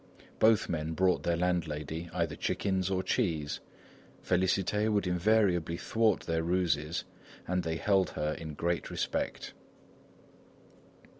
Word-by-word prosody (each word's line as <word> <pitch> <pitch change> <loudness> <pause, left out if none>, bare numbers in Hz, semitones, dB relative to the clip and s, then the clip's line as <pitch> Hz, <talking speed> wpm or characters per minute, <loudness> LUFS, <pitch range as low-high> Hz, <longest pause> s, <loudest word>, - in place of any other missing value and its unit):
Both 110 -1 +4
men 80 -1 -2
brought 95 +2 +2
their 85 -1 0
landlady 85 -2 -2
either 85 -3 -1
chickens 95 +2 -1
or 95 -1 0
cheese. 85 - -1 0.7
Félicité 95 +3 +1
would 105 -1 +1
invariably 90 -2 +2
thwart 110 +1 +1
their 80 -1 -1
ruses 85 -2 0 0.4
and 90 0 +1
they 80 -1 -2
held 95 +2 +2
her 75 0 0
in 80 -2 -7
great 85 +2 -1
respect. - - -3
90 Hz, 120 wpm, -31 LUFS, 80-95 Hz, 0.7 s, Both